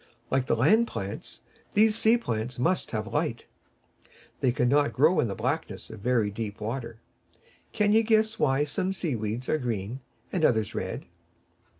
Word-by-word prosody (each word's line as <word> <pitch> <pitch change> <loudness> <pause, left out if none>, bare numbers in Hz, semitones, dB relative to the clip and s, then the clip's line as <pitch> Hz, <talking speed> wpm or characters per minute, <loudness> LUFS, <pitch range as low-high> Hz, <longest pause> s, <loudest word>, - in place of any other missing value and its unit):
Like 130 -1 +1
the - - +2
land 215 - +4
plants, 100 - -6 0.3
these 215 +1 +4
sea 225 +2 +4
plants 120 - -3
must 170 +9 0
have 110 0 -4
light. 150 -6 -1 0.9
They 130 - +2
cannot 135 +4 +2
grow 155 +7 +4
in - - +2
the 100 - -4
blackness 125 - -3
of 110 - -9
very 115 -2 +1
deep 105 0 -5
water. 115 +1 -5 0.7
Can 210 0 +2
you 220 - +6
guess 220 0 +2
why 135 0 +3
some 185 +6 -1
sea 165 -8 -1
weeds 110 +3 -3
are 155 - +1
green 115 -1 -3 0.3
and 180 - 0
others 110 -7 +2
red? - - -4
125 Hz, 165 wpm, -27 LUFS, 110-175 Hz, 0.9 s, you